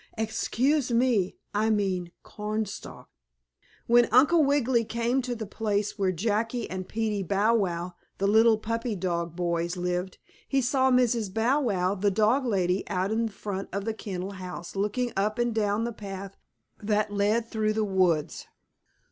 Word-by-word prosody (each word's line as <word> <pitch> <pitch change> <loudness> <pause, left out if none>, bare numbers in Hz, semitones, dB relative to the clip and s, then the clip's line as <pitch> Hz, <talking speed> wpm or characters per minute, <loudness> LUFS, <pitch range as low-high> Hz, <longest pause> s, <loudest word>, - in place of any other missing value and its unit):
Excuse 240 +5 0
me, 235 -6 +2 0.2
I 215 +2 +1
mean 190 -5 0
corn 215 +1 -3
stalk. 195 - -9 0.8
When 240 0 +5
Uncle 300 +7 +5
Wiggily 260 -4 +2
came 235 +4 0
to 250 -1 -3
the 220 -1 -5
place 210 0 -2
where 190 -2 +2
Jackie 220 +5 -1
and 185 0 -4
Peetie 215 -2 -1
Bow 200 +5 +2
Wow, 180 -5 -1 0.2
the 195 - -1
little 220 +2 +5
puppy 230 +1 -3
dog 170 -2 -2
boys 170 0 -1
lived, 180 +1 -2 0.3
he 275 - +1
saw 260 +1 +2
Mrs. 240 -5 +2
Bow 240 +8 +2
Wow, 190 -7 +1
the 205 +1 +1
dog 220 +7 +2
lady, 185 -3 +1
out 190 +1 -1
in 225 +1 +1
front 200 -2 -5
of 200 +1 -3
the 225 - -1
kennel 190 -3 -5
house 180 -2 -8
looking 210 +5 -1
up 210 +2 0
and 240 -1 0
down 210 0 0
the 235 0 -3
path 195 -2 -7 0.5
that 210 0 0
led 210 +3 +1
through 215 -1 0
the 215 0 0
woods. 185 -6 0
210 Hz, 160 wpm, -27 LUFS, 190-230 Hz, 0.8 s, When